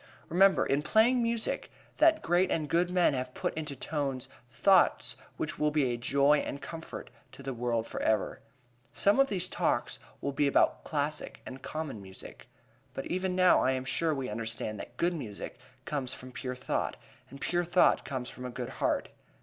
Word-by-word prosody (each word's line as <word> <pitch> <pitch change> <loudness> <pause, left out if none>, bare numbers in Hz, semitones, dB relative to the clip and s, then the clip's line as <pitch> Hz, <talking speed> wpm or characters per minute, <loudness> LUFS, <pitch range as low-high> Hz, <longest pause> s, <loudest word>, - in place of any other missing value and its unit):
Remember, 190 +3 +5
in 140 +2 +1
playing 230 +9 +4
music, 230 -1 -1 0.3
that 320 -1 +5
great 175 +2 +3
and 155 -2 0
good 170 +4 +2
men 180 -4 +3
have 130 -1 -3
put - - -2
into 150 -3 -4
tones 135 -3 -3 0.2
thoughts 185 - +3 0.2
which - - -3
will 150 - +3
be 145 -5 +1
a - - -1
joy 140 +5 +3
and 140 - -4
comfort 165 +3 -8 0.2
to 140 - -11
the 135 0 -3
world 120 -1 -1
forever. 110 -1 0 0.5
Some 200 +1 +3
one 275 0 +5
of - - -14
these 185 -3 +1
Talks - - -1 0.2
will 140 - -2
be 140 +1 +2
about 140 - +3
classic 150 0 -2
and 130 +1 -8
common 155 -9 -5
music. 95 -1 -11 0.5
But - - -4
even 185 0 0
now 185 -1 +5
I 130 - +3
am 130 0 -3
sure 160 +5 +1
we 135 -4 -2
understand 110 -1 -3
that - - -9
good 175 +1 +2
music 120 -8 -6 0.3
comes 135 -4 -2
from 130 0 -10
pure 125 +1 -5
thought, 125 - -2 0.3
and 140 - -11
pure 175 +4 0
thought 175 +1 +4
comes 130 -3 -4
from 125 - -9
a - - -3
good 120 - -5
heart. - - +1
145 Hz, 185 wpm, -30 LUFS, 130-175 Hz, 0.5 s, Remember